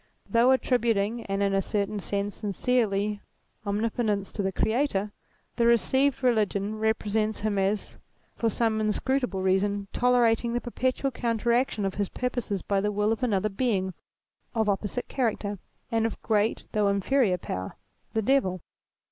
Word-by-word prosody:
Though 235 +2 +4
attributing, 235 -4 +1
and 195 0 0
in 200 0 +1
a 195 - +3
certain 205 +1 -1
sense 200 +1 -2
sincerely, 210 -1 0 0.5
omni 205 +3 +1
potence 210 -5 -1
to - - -3
the 190 -1 0
Creator, 220 -1 0 0.5
the 235 -1 +3
received 265 +3 +3
religion 215 -3 +1
represents 220 0 0
him 205 -2 0
as 195 +2 -1 0.4
for 230 - +1
some 220 0 0
inscrutable 215 -1 0
reason 195 +1 +1
tolerating 240 -1 +3
the 240 - +1
per 240 - -8
petual 260 +2 0
counteraction 235 -2 0
of 195 - -1
his 200 - -1
purposes 245 -6 -2
by 200 -1 +1
the 210 +1 0
will 210 +1 +1
oi 225 - +1
another 215 -4 +1
Being 195 -4 0 0.6
of 220 -2 +1
opposite 205 +4 -1
character 215 -5 -1 0.3
and 225 -1 +2
of 225 - -7
great 215 0 +1
though 210 -1 +2
inferior 200 +1 +2
power, 95 - -5 0.4
the 220 - +1
Devil. 200 -8 +2
215 Hz, 150 wpm, -27 LUFS, 200-235 Hz, 0.6 s, Though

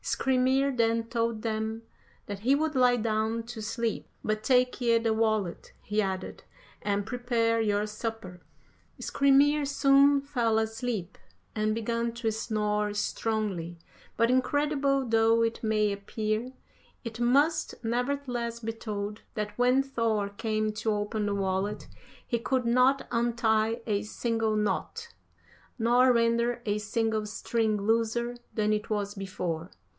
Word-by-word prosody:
Skrymir 265 +1 +1
then 230 -1 +2
told 230 -1 -2
them 220 0 -2 0.4
that 200 -1 -6
he 255 +7 +3
would 310 +1 0
lie 250 -1 +5
down 220 0 -1
to 230 -1 -8
sleep. 225 +1 -2 0.2
'But 215 0 -1
take 250 0 +2
ye 235 -1 +4
the 225 -1 +1
wallet,' 215 -5 -1
he 210 +1 0
added, 190 -2 -4 0.4
'and 205 -1 -1
prepare 230 -1 0
your 205 -1 +1
supper.' 215 -4 -6 0.6
"Skrymir 280 +2 +3
soon 280 0 +4
fell 245 -6 0
asleep, 220 -3 -3 0.4
and 215 0 0
began 230 +1 -1
to 235 -1 -1
snore 210 -1 -1
strongly, 205 -6 -2 0.4
but 230 +1 +3
incredible 275 +1 +1
though 225 0 +3
it 230 +1 -2
may 215 -1 +2
appear, 215 +4 -3 0.5
it 230 -2 -6
must 280 +7 +2
nevertheless 245 -1 -2
be 225 -1 -4
told, 210 -1 -5
that 210 -1 -3
when 250 +3 +3
Thor 225 -6 -1
came 215 0 -2
to 215 +1 -1
open 210 0 -2
the 200 - 0
wallet 195 +1 -2 0.4
he 235 - -1
could 250 +1 0
not 255 +3 +3
untie 230 -1 +1
a 205 -3 0
single 225 0 -1
knot, 460 - -2 0.6
nor 245 +2 +4
render 235 0 +2
a 210 -1 0
single 220 0 -1
string 220 0 0
looser 230 +3 0 0.2
than 215 -1 +2
it 210 0 -2
was 205 -2 -1
before. 185 -4 -4
225 Hz, 135 wpm, -28 LUFS, 215-245 Hz, 0.6 s, lie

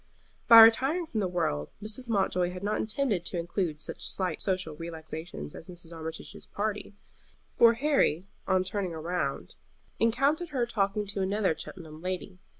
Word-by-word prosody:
By 230 -1 +11
retiring 270 +10 +5
from 235 -8 -3
the 195 - +1
world 165 - -1
Mrs. 220 +4 -4
Mountjoy 185 -4 +1
had 180 +1 -7
not 210 +1 0
intended 215 -4 -1
to 180 - 0
include 170 -2 -2
such - - -4
slight 185 -4 -2
social 185 -5 -1
relaxations 160 - -7
as - - -9
Mrs. 175 -2 -10
Armitage's 160 0 -8
party, 210 0 -3 0.6
for 230 0 +7
Harry 240 - +2 0.2
on 185 -1 +3
turning 185 -2 -3
round 170 +3 -3 0.5
encountered 275 +9 +2
her 260 -5 0
talking 210 -2 -1
to 200 0 -2
another 190 -2 +1
Cheltenham 160 -3 -9
lady. 185 +1 -4
190 Hz, 150 wpm, -29 LUFS, 170-225 Hz, 0.6 s, By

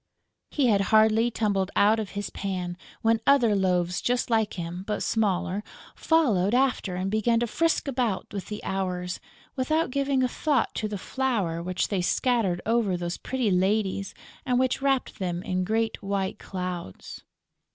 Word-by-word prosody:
He 285 - +1
had 205 -5 +4
hardly 220 +2 +5
tumbled 200 -4 0
out 215 +2 +4
of 200 -2 -5
his 205 - -3
pan, 180 -3 -3 0.3
when 225 0 +3
other 245 -7 +5
loaves 180 -2 +1
just 245 0 0
like 220 -2 +1
him, 175 +1 -5
but 210 - -1
smaller, 200 -2 0 0.3
followed 235 - +2
after 250 -8 +1
and 185 +2 -2
began 230 +2 +2
to - - +2
frisk 330 +7 0
about 245 -7 -1
with 200 -2 -5
the 210 0 -6
Hours, 180 -2 -2 0.4
without 300 +2 0
giving 275 -1 +1
a - - +3
thought 275 0 0
to 215 - -2
the 210 -1 -4
flour 200 -8 -1
which 180 +1 -1
they 195 -3 0
scattered 195 -2 +1
over 220 -5 +1
those 175 0 -3
pretty 255 -6 -1
ladies 195 +1 0 0.3
and 250 -2 +1
which 255 +1 +1
wrapped 270 -2 0
them 180 -2 -2
in 185 0 -1
great 220 +3 -1
white 195 -1 -2
clouds. 180 - -6
210 Hz, 160 wpm, -26 LUFS, 185-245 Hz, 0.4 s, hardly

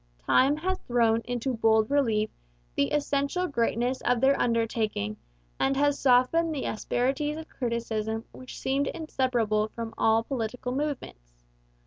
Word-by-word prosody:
Time 275 - +4
has 375 +4 -2
thrown 230 -2 +3
into 245 +2 -2
bold 220 0 +2
relief 225 -7 +2 0.4
the 140 - +1
essential 290 +4 0
greatness 245 -3 0
of 245 -1 +1
their 270 +2 +4
undertaking 225 - 0 0.4
and 270 0 +1
has 285 0 +2
softened 275 +6 +3
the 270 - -3
asperities 270 +7 -1
of 320 0 -8
criticism 225 -2 -3
which 255 0 -10
seem 275 +1 0
inseparable 245 -9 0
from 230 -1 -5
all 225 0 +3
political 250 0 -3
movements. - - -5
245 Hz, 130 wpm, -27 LUFS, 225-280 Hz, 0.4 s, Time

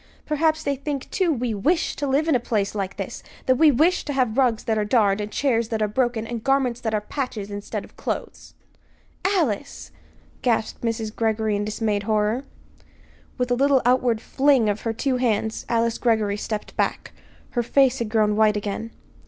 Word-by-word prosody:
Perhaps 315 +1 +1
they 280 - 0
think, 280 0 -4
too, 370 -3 +1
we 245 -5 -1
wish 315 - +1
to 285 - -2
live 280 +4 +1
in 320 - +3
a 250 - +3
place 210 -4 -1
like 195 -2 -4
this; - - -5 0.2
that 255 -1 +3
we 315 - +7
wish 320 +7 +3
to 290 - -3
have 250 -5 +1
rugs 250 -5 +2
that 220 - 0
are 215 - +1
darned, 210 -2 +2
and 210 0 -5
chairs 235 -4 +1
that 225 - -1
are 215 - +2
broken, 240 0 0
and 230 -1 -5
garments 270 -3 +1
that 220 -2 -1
are 210 - 0
patches 210 -4 -4
instead 205 0 -5
of - - -20
clothes!" - - -5 0.7
"Alice!" 290 - -1 0.5
gasped 230 -3 0
Mrs. 225 -2 -2
Greggory 220 -1 0
in 205 - -1
dismayed 210 -1 -1
horror. 215 +4 +1 0.9
With 250 -1 -1
a - - +4
little 275 0 +3
outward 245 -3 +2
fling 265 -6 +3
of 205 +1 -2
her 225 - -2
two 255 +3 0
hands 220 -3 -1
Alice 230 -1 +1
Greggory 220 -4 +1
stepped 210 0 -5
back. - - -1 0.4
Her 240 - 0
face 265 +2 +3
had 230 -2 -2
grown 215 -1 +2
white 215 -1 +3
again. 210 +2 -4
235 Hz, 190 wpm, -23 LUFS, 215-270 Hz, 0.9 s, we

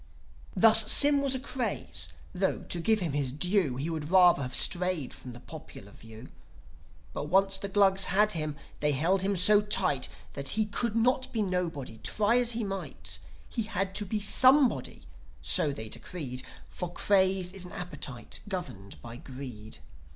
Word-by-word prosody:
Thus, 220 -1 +7
Sym 285 -1 +7
was 275 -1 +1
a - - -3
craze; 255 -2 -3 0.2
tho', 190 +1 -2
to 175 - -2
give 220 +5 +1
him 170 -4 -2
his 140 -3 -2
due, 175 -1 -1
He 135 +5 -4
would 160 -2 -5
rather 180 -4 +5
have 130 0 -4
strayed 180 -6 +2
from 125 - -10
the 120 - -11
popular 140 -8 -12
view. 110 +3 -14 0.8
But - - -5
once 195 +4 +1
the 200 - -5
Glugs 195 -1 +3
had 210 +3 +2
him 155 -5 -3 0.2
they 150 0 0
held 175 +8 +1
him 195 0 -1
so 205 +4 +5
tight 145 - 0 0.2
That 140 -1 -2
he 215 - +1
could 215 +2 -3
not 255 +3 0
be 220 -3 -1
nobody, 170 - -4
try 215 +3 0
as 240 -1 +1
he 230 0 -3
might. 195 -1 -6 0.3
He 235 - -4
had 195 -3 -3
to 205 +1 -3
be 215 +2 -2
Somebody, 260 +5 +3 0.4
so 150 - +3
they 110 -5 -6
decreed. 125 +3 -6 0.3
For 180 -1 -6
Craze 190 -1 +1
is 195 -2 -6
an 180 - -11
appetite, 145 -8 -6
governed 130 - -7
by 120 0 -10
Greed. 125 -7 -10
180 Hz, 170 wpm, -28 LUFS, 140-210 Hz, 0.8 s, Thus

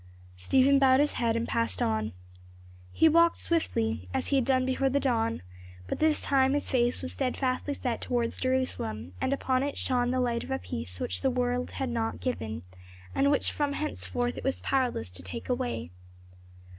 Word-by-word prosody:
Stephen 265 - +4
bowed 265 -1 +5
his 295 +1 +3
head 230 -1 0
and 230 +1 -1
passed 110 -5 -1
on. 110 -1 0 0.8
He 320 - +4
walked 335 +1 +5
swiftly 110 - -1
as - - 0
he 280 - +3
had 260 - +2
done 260 -1 +2
before 260 +1 +1
the 280 +2 +2
dawn 230 - 0 0.4
but - - -4
this 310 -1 +3
time 270 -1 +3
his 290 - -1
face 245 -1 +2
was 260 - -2
steadfastly 265 +1 -1
set 245 -4 -3
towards 240 -2 -1
Jerusalem, 115 - -1
and - - 0
upon 260 -2 +1
it 285 +1 -2
shone 245 -2 +1
the 255 +1 0
light 240 -2 0
of - - -10
a - - 0
peace 90 +1 -6
which 90 - -2
the - - +2
world 250 0 0
had 265 -2 -2
not 230 -2 -2
given, 115 - -3 0.5
and 280 - +3
which 285 - +2
from 290 -1 -1
henceforth 245 -5 -2
it - - -9
was 270 - -1
powerless 250 - 0
to 90 0 -5
take 90 - -7
away. 245 - -2
255 Hz, 185 wpm, -29 LUFS, 225-270 Hz, 0.8 s, bowed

